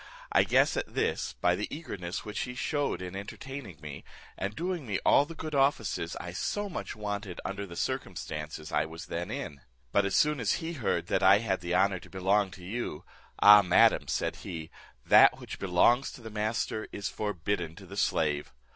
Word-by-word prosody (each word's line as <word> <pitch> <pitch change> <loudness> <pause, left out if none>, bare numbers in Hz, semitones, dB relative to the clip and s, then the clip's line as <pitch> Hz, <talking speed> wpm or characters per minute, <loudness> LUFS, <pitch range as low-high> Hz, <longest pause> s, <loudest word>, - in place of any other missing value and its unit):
I - - +5
guessed - - +3
at - - -4
this, - - 0
by - - +4
the - - -3
eagerness 100 - -5
which 105 - -4
he 125 - -3
shewed 140 - -1
in 90 +1 -6
entertaining 100 - -7
me, 75 -3 -8 0.3
and 100 +2 -4
doing 175 -5 -3
me 100 -3 0
all 140 - +6
the 165 - -9
good 155 -1 -6
offices 135 - +1
I 90 - -6
so 205 - -2
much 180 - -5
wanted 105 -3 -4
under 100 +1 -4
the 85 - -9
circumstances 75 -2 -4
I - - +2
was 80 +1 -8
then 85 +2 -4
in; 70 -2 -5 0.3
but 100 - +3
as 100 0 0
soon 150 -1 +3
as 110 -4 +1
he 165 +1 -3
heard 130 -9 -1
that - - 0
I 95 +2 +7
had 105 -4 -1
the 90 0 -1
honour 95 0 +3
to - - -15
belong 95 +2 +2
to 90 -1 -12
you, 105 -6 -4 0.4
'Ah, 105 0 +10
madam,' 90 -3 +4
said - - -1
he, 80 -2 -7 0.3
'that - - +7
which - - -8
belongs 100 +8 +3
to - - -11
the 110 -1 -8
master 110 0 -2
is 100 - -4
forbidden 90 -4 -3
to - - -12
the - - -10
slave.' 75 -3 0
100 Hz, 195 wpm, -29 LUFS, 90-120 Hz, 0.4 s, Ah